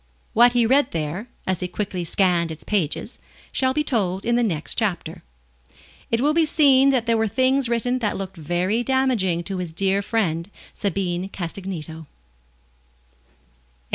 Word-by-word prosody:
What 240 Hz, +1 st, +6 dB
he 240 Hz, -2 st, +3 dB
read 270 Hz, +3 st, +3 dB
there, 165 Hz, +7 st, -3 dB, 0.2 s
as 185 Hz, -2 st, -1 dB
he 180 Hz, -, -2 dB
quickly 185 Hz, -1 st, -3 dB
scanned 170 Hz, -1 st, +1 dB
its 160 Hz, -1 st, -7 dB
pages, 185 Hz, -8 st, -2 dB, 0.3 s
shall 260 Hz, -1 st, +1 dB
be 300 Hz, +3 st, 0 dB
told 195 Hz, -9 st, 0 dB
in 235 Hz, -, +2 dB
the 240 Hz, -, +3 dB
next 165 Hz, -9 st, -1 dB
chapter. 175 Hz, -7 st, -2 dB, 0.9 s
It 230 Hz, +1 st, +1 dB
will 295 Hz, +3 st, +3 dB
be 330 Hz, +1 st, +4 dB
seen 275 Hz, -3 st, +5 dB
that 255 Hz, -4 st, +2 dB
there 230 Hz, -1 st, +2 dB
were 220 Hz, -, +2 dB
things 260 Hz, +3 st, +2 dB
written 245 Hz, +2 st, 0 dB
that 215 Hz, -4 st, -1 dB
looked 195 Hz, -1 st, -6 dB
very 175 Hz, +8 st, -1 dB
damaging 240 Hz, -10 st, +1 dB
to 190 Hz, +2 st, -4 dB
his 175 Hz, -3 st, -4 dB
dear 195 Hz, +4 st, +1 dB
friend, 190 Hz, -6 st, -1 dB, 0.2 s
Sabine 185 Hz, -2 st, -2 dB
Castagneto. 170 Hz, -4 st, -6 dB
200 Hz, 155 wpm, -23 LUFS, 175-245 Hz, 0.9 s, What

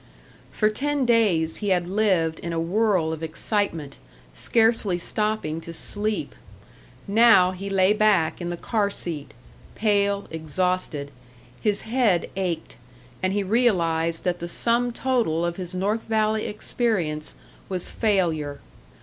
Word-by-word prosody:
For 215 Hz, -1 st, +1 dB
ten 285 Hz, +4 st, -1 dB
days 200 Hz, -9 st, +2 dB
he 205 Hz, -, -2 dB
had 180 Hz, -2 st, +2 dB
lived 185 Hz, -5 st, +1 dB
in 170 Hz, -1 st, -4 dB
a 165 Hz, -, -1 dB
whirl 180 Hz, -2 st, +1 dB
of 160 Hz, -, -6 dB
excitement, 165 Hz, -2 st, -2 dB, 0.4 s
scarcely 220 Hz, -, +2 dB
stopping 210 Hz, -4 st, -2 dB
to 170 Hz, -, -8 dB
sleep. 210 Hz, +4 st, -3 dB, 0.7 s
Now 205 Hz, -3 st, +6 dB
he 195 Hz, +2 st, -6 dB
lay 195 Hz, +1 st, +4 dB
back 210 Hz, -7 st, +2 dB
in 175 Hz, -, -3 dB
the 175 Hz, -, -4 dB
car 210 Hz, +2 st, 0 dB
seat, 160 Hz, -, -4 dB, 0.4 s
pale, 200 Hz, -2 st, +1 dB
exhausted; 160 Hz, -2 st, -2 dB, 0.5 s
his 205 Hz, -2 st, +1 dB
head 220 Hz, -7 st, +1 dB
ached, 180 Hz, -4 st, -3 dB, 0.4 s
and 185 Hz, -, +1 dB
he 205 Hz, +1 st, 0 dB
realised 170 Hz, -7 st, +1 dB
that 175 Hz, -1 st, -1 dB
the 170 Hz, -, -5 dB
sum 240 Hz, +6 st, +1 dB
total 230 Hz, -11 st, 0 dB
of 170 Hz, 0 st, -3 dB
his 185 Hz, -1 st, -5 dB
North 205 Hz, +5 st, 0 dB
Valley 220 Hz, -1 st, +1 dB
experience 195 Hz, -8 st, -2 dB, 0.3 s
was 185 Hz, -2 st, -2 dB
failure. 165 Hz, -9 st, 0 dB
190 Hz, 130 wpm, -24 LUFS, 165-215 Hz, 0.7 s, Now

